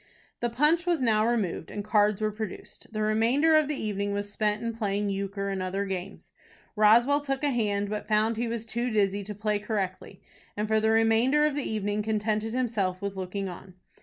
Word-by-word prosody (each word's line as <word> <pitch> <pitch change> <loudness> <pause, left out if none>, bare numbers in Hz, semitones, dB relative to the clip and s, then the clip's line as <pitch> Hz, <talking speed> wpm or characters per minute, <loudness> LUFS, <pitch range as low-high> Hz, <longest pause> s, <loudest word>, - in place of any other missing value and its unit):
The 240 - 0
punch 300 +8 +2
was 335 -6 +1
now 220 -2 +3
removed, 210 -9 -1
and 205 -1 -5
cards 210 -1 +2
were 215 - +1
produced. 210 0 -8
The 215 -1 -2
remainder 235 +9 +3
of 310 -2 +4
the 300 - -2
evening 205 -1 -2
was 205 0 -3
spent 210 0 0
in 230 0 -2
playing 205 -2 -1
euchre 200 0 -3
and 195 -1 -2
other 190 +2 -2
games. 190 0 -6 0.4
Roswell 235 +7 +5
took 275 -1 -3
a 290 - +2
hand, 205 -4 0
but 210 +1 -4
found 215 +1 +2
he 235 +2 -2
was 230 -1 -4
too 235 +2 -2
dizzy 205 -2 +1
to 210 +1 -7
play 210 0 -1
correctly, 200 -3 -4 0.4
and 210 +1 -1
for 220 0 +3
the 220 0 +2
remainder 225 +6 +4
of 300 - +1
the 290 -1 -3
evening 210 -1 -1
contented 215 +1 -1
himself 210 -8 -1
with 200 0 -4
looking 190 +1 -4
on. 185 0 -10
215 Hz, 200 wpm, -27 LUFS, 200-230 Hz, 0.4 s, Roswell